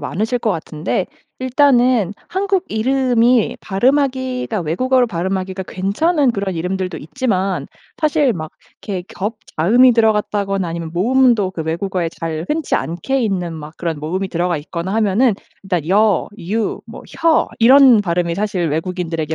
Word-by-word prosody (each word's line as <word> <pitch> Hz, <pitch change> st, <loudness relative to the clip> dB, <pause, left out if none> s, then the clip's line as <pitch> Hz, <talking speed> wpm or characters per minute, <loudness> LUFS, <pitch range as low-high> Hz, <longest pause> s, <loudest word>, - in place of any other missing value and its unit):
많으실 215 Hz, -, -2 dB
것 225 Hz, -, 0 dB
같은데 165 Hz, +1 st, -2 dB, 0.3 s
일단은 255 Hz, -, +3 dB, 0.2 s
한국 385 Hz, 0 st, 0 dB
이름이 245 Hz, 0 st, +2 dB
발음하기가 255 Hz, 0 st, 0 dB
외국어로 250 Hz, +10 st, +1 dB
발음하기가 190 Hz, 0 st, -3 dB
괜찮은 255 Hz, -, +1 dB
그런 195 Hz, -3 st, -3 dB
이름들도 180 Hz, +2 st, -3 dB
있지만 195 Hz, -, -2 dB, 0.3 s
사실 300 Hz, -5 st, +2 dB
막 155 Hz, -2 st, -6 dB, 0.3 s
이렇게 190 Hz, -3 st, -4 dB
겹자음이 220 Hz, +3 st, +2 dB
들어갔다거나 205 Hz, -4 st, +1 dB
아니면 165 Hz, -1 st, -5 dB
모음도 235 Hz, +1 st, +3 dB
그 160 Hz, -, -4 dB
외국어에 170 Hz, +2 st, -2 dB
잘 160 Hz, -1 st, -3 dB
흔치 310 Hz, -2 st, -1 dB
않게 175 Hz, +12 st, -1 dB
있는 180 Hz, -6 st, -2 dB
막 150 Hz, -1 st, -9 dB
그런 165 Hz, -3 st, -3 dB
모음이 185 Hz, +6 st, -2 dB
들어가 175 Hz, -1 st, -1 dB
있거나 170 Hz, +5 st, -5 dB
하면은 220 Hz, +2 st, +3 dB, 0.3 s
일단 175 Hz, -4 st, -2 dB
여, 205 Hz, -1 st, +3 dB
유, 205 Hz, +5 st, -2 dB
뭐 -, -, -10 dB, 0.2 s
혀 330 Hz, -1 st, +3 dB
이런 255 Hz, -1 st, +7 dB
발음이 170 Hz, -2 st, -1 dB
사실 195 Hz, -4 st, -1 dB
외국인들에게 165 Hz, -1 st, -3 dB
195 Hz, 340 characters per minute, -18 LUFS, 175-250 Hz, 0.3 s, 이런